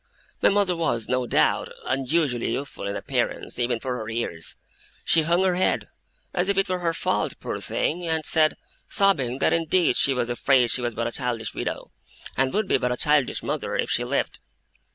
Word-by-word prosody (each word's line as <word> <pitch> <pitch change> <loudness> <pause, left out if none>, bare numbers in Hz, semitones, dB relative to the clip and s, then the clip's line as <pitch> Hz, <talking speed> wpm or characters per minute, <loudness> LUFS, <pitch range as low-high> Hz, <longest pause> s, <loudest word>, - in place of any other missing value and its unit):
My - - +6
mother 200 -3 +2
was, 120 -9 -1
no 125 -1 0
doubt, - - +2
unusually 135 -1 0
youthful 140 -7 -4
in 100 - -3
appearance - - -2
even 120 -1 +1
for 125 +1 -3
her 110 -1 -5
years; 110 -8 -4 0.5
she 165 - +5
hung 170 +4 +2
her 185 -1 +3
head, 185 +1 0 0.4
as 180 +2 0
if 200 - +1
it 195 0 +3
were 185 0 -1
her 170 -1 0
fault, 165 - -1
poor - - -4
thing, 175 +2 -1
and 160 -1 -1
said, 155 -1 +3 0.3
sobbing, 140 -11 +2
that - - +2
indeed 165 -3 +2
she 135 - +3
was 120 -2 0
afraid 125 0 +3
she 125 - 0
was 120 -2 -2
but 115 - -1
a 120 - -2
childish 120 -4 -2
widow, - - -4 0.4
and 135 0 +1
would 210 0 0
be - - +2
but 125 - 0
a 125 - -1
childish 150 -2 +2
mother - - -2
if - - -1
she - - +2
lived. - - -1
135 Hz, 195 wpm, -25 LUFS, 120-170 Hz, 0.5 s, My